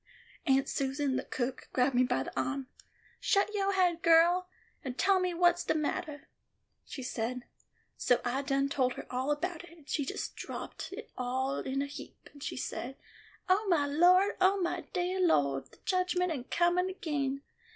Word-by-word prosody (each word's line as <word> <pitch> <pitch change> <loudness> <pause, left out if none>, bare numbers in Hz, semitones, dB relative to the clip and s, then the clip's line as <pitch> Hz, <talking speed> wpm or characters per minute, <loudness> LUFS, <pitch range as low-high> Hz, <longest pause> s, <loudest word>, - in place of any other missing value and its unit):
Aunt 270 0 +3
Susan, 275 0 -1
the - - -1
cook, 255 +1 -4
grab 260 +1 +2
me 245 - +4
by 190 - 0
the - - -8
ahm. 275 -1 -1 0.5
'Shut 400 +1 +2
yo 395 -1 +1
haid, 360 -3 +2
girl, 345 +2 +5 0.3
and 255 -1 -5
tell 390 0 +4
me 365 -1 0
wha's 350 0 +3
de - - 0
mattah,' 305 -1 -2 0.6
she 265 - -7
said. 250 0 -3 0.5
So 245 - +3
I 250 +3 0
done 275 0 +1
told 260 -2 +1
her - - -8
all 255 +2 -1
about 330 +3 -2
it, 345 0 -14
and 300 -3 -20
she 290 - 0
just 270 - -4
dropped - - -6 0.2
all 260 +2 -1
in 275 +1 -1
a - - -2
heap 280 - -11
and 285 - -15
she - - -4
say: 260 +1 -4 0.5
'O 400 +3 +3
my 315 -5 +3
Lawd, 360 +7 +4
O 385 +2 +4
my 345 -2 -2
deah 365 +1 -1
Lawd, 140 - +2
the - - -20
judgment 360 -1 +1
am 305 - -2
a - - -8
comin' 350 +4 +2
agin! 285 -7 -2
295 Hz, 180 wpm, -31 LUFS, 265-360 Hz, 0.6 s, girl